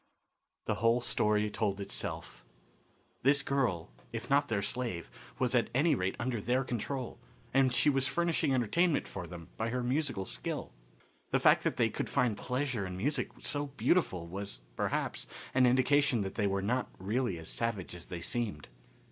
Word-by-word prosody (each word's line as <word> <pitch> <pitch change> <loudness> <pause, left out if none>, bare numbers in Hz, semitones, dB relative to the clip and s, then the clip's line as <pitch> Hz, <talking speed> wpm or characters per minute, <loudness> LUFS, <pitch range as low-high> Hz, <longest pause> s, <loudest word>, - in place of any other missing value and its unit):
The - - +1
whole 115 +1 +4
story 105 -3 +2
told 100 -2 -1
itself. 100 - -4 0.8
This 140 +2 +5
girl, 120 - 0 0.2
if 115 +2 -5
not 145 +1 +4
their 105 -3 0
slave, 115 -8 -3 0.3
was 125 -1 +1
at 120 -3 +3
any 150 +5 +4
rate 95 +1 0
under 120 -2 -2
their 125 +5 +1
control, 125 +1 -3 0.3
and 135 -1 +4
she 125 - +3
was 135 -2 +3
furnishing 170 -3 +1
entertainment 145 - +2
for 90 -3 -6
them 85 -1 -9
by 110 +1 -1
her 125 +1 -1
musical 125 -6 0
skill. - - -4 0.6
The - - +3
fact - - +5
that - - 0
they - - +3
could - - -3
find 125 -4 +2
pleasure 125 -2 -1
in 90 0 -6
music 145 +10 0
so 145 0 -2
beautiful 115 - +2
was, 95 -8 -6
perhaps, - - -1 0.3
an 130 -1 +5
indication 130 0 +4
that 95 -1 -3
they 105 -3 +1
were 100 0 0
not 125 +5 0
really 105 +1 -1
as 80 0 -8
savage 110 -7 -2
as 90 - -9
they 85 -1 -5
seemed. 105 - -3
120 Hz, 170 wpm, -32 LUFS, 100-135 Hz, 0.8 s, This